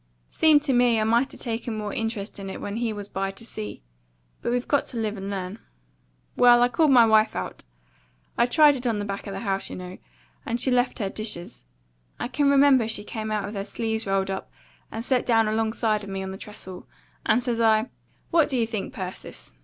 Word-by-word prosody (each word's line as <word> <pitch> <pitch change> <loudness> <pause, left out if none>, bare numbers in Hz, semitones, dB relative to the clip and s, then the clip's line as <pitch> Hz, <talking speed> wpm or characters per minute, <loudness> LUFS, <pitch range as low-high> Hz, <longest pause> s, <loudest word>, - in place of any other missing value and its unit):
Seemed 305 -2 +4
to 280 -3 +1
me 245 -2 +4
I - - +2
might 235 +5 +2
'a - - -12
taken 230 -1 -4
more 210 -1 -4
interest 225 -2 -4
in 195 -1 -6
it - - -6
when 205 +2 -4
he 235 -1 -1
was 205 -1 -3
by 195 -1 -2
to 195 +4 -10
see; 105 - -7 0.6
but 235 - -1
we've 245 0 -1
got 285 - +1
to 245 - -6
live 215 -2 -1
and 195 0 -6
learn. 195 +1 -4 0.8
Well, 245 -1 +6
I 245 - +3
called 315 +3 +3
my 245 -4 +7
wife 220 0 +4
out, - - -5 0.7
I'd 240 +1 +2
tried 300 -3 +6
it 250 -1 -3
on 225 -3 +1
the 205 - -3
back 200 0 -5
of 200 - -5
the - - -5
house, 195 -3 -2
you - - -6
know, 180 0 -8 0.4
and 235 +1 -2
she 260 - +1
left 250 0 +2
her 200 -5 -2
dishes, 195 - -5 0.5
I - - -3
can 285 +1 +2
remember 275 -4 +5
she 220 -2 -2
came 220 0 -5
out 210 -2 -1
with 205 - -6
her 195 -2 -3
sleeves 220 +1 -3
rolled 195 0 0
up 190 - -5 0.4
and 225 +1 -5
set 255 -2 +2
down 225 -2 +3
alongside 220 -1 0
of 200 - -8
me 195 0 -4
on 190 - -5
the 190 - -7
trestle, 190 -3 -8 0.4
and 245 +3 +2
says 235 -2 -1
I, 220 +1 +3 0.4
'What 325 -3 +4
do 265 - 0
you 230 - +2
think, 220 -4 -5
Persis?' 185 - -8
220 Hz, 225 wpm, -25 LUFS, 200-245 Hz, 0.8 s, my